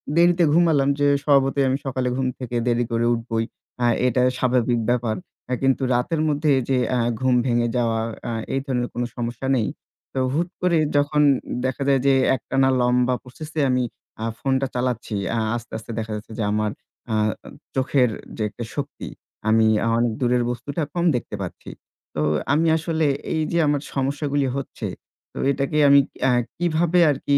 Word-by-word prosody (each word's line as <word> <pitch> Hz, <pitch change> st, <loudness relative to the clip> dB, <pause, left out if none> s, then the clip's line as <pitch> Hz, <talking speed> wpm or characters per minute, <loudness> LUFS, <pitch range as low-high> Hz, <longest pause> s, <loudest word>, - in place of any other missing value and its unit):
দেরিতে 175 Hz, 0 st, +4 dB
ঘুমালাম 160 Hz, -5 st, +4 dB
যে 145 Hz, -, +3 dB, 0.2 s
স্বভাবতই 140 Hz, -1 st, +3 dB
আমি 135 Hz, -, +1 dB
সকালে 130 Hz, -1 st, -1 dB
ঘুম 130 Hz, -1 st, 0 dB
থেকে 125 Hz, -1 st, -5 dB
দেরি 120 Hz, 0 st, +2 dB
করে 115 Hz, 0 st, +1 dB
উঠবোই, 115 Hz, -1 st, -2 dB, 0.4 s
আ -, -, +4 dB, 0.2 s
এটা 125 Hz, +1 st, +2 dB, 0.2 s
স্বাভাবিক 120 Hz, -2 st, +1 dB
ব্যাপার। 115 Hz, -3 st, 0 dB, 0.3 s
এ -, -, +2 dB
কিন্তু 135 Hz, 0 st, +2 dB
রাতের 155 Hz, +6 st, 0 dB
মধ্যে 145 Hz, 0 st, +1 dB, 0.2 s
যে 130 Hz, -, +3 dB, 0.2 s
আ -, -, +1 dB, 0.2 s
ঘুম 130 Hz, -1 st, +2 dB
ভেঙে 120 Hz, -1 st, +2 dB
যাওয়া, 115 Hz, -2 st, +1 dB, 0.3 s
আ -, -, -2 dB, 0.2 s
এই 135 Hz, -, +1 dB
ধরনের 125 Hz, -3 st, -1 dB
কোন 120 Hz, -, -2 dB
সমস্যা 120 Hz, +2 st, -3 dB
নেই। 110 Hz, -4 st, +1 dB, 0.5 s
তো 130 Hz, -, -1 dB
হুট 170 Hz, +3 st, 0 dB
করে 175 Hz, -2 st, +3 dB, 0.2 s
যখন 145 Hz, +1 st, +3 dB, 0.4 s
দেখা 130 Hz, +1 st, -1 dB
যায় 135 Hz, -1 st, +4 dB
যে 135 Hz, -, +6 dB, 0.2 s
একটানা 135 Hz, +2 st, +1 dB
লম্বা 125 Hz, +1 st, +2 dB
প্রসেস 150 Hz, +5 st, -10 dB
এ -, -, +3 dB
আমি 125 Hz, 0 st, +2 dB, 0.4 s
আ -, -, -1 dB
phone 135 Hz, -1 st, +1 dB
টা 135 Hz, -, 0 dB
চালাচ্ছি। 125 Hz, -4 st, -2 dB, 0.2 s
আ -, -, 0 dB, 0.2 s
আস্তে, 120 Hz, 0 st, -7 dB
আস্তে 115 Hz, +1 st, -9 dB
দেখা 110 Hz, 0 st, -4 dB
যাচ্ছে 105 Hz, +1 st, -8 dB
যে -, -, +1 dB
আমার 105 Hz, 0 st, 0 dB, 0.4 s
আ -, -, +2 dB, 0.6 s
চোখের 130 Hz, -1 st, +2 dB, 0.3 s
যে -, -, -4 dB
একটা 120 Hz, +3 st, -7 dB
শক্তি, 145 Hz, -1 st, -5 dB, 0.4 s
আমি 110 Hz, 0 st, +4 dB, 0.3 s
অনেক 120 Hz, -1 st, +2 dB
দূরের 125 Hz, 0 st, +2 dB
বস্তুটা 140 Hz, +6 st, -4 dB
কম 175 Hz, 0 st, 0 dB
দেখতে 115 Hz, -3 st, -3 dB
পাচ্ছি। 90 Hz, -, -7 dB, 0.5 s
তো 75 Hz, -, -1 dB, 0.3 s
আমি 165 Hz, +2 st, +3 dB
আসলে 160 Hz, -1 st, -1 dB, 0.3 s
এই 160 Hz, -, 0 dB
যে 170 Hz, -, +1 dB
আমার 145 Hz, -1 st, +1 dB
সমস্যাগুলি 140 Hz, 0 st, 0 dB
হচ্ছে, 140 Hz, -, -5 dB, 0.5 s
তো -, -, -11 dB
এটাকে 140 Hz, +2 st, -1 dB
আমি 140 Hz, 0 st, +8 dB
কি -, -, -20 dB
আ -, -, +4 dB, 0.3 s
কিভাবে 175 Hz, +1 st, +2 dB
আর 140 Hz, -, +1 dB
কি 140 Hz, 0 st, +4 dB
130 Hz, 180 wpm, -23 LUFS, 120-145 Hz, 0.6 s, আমি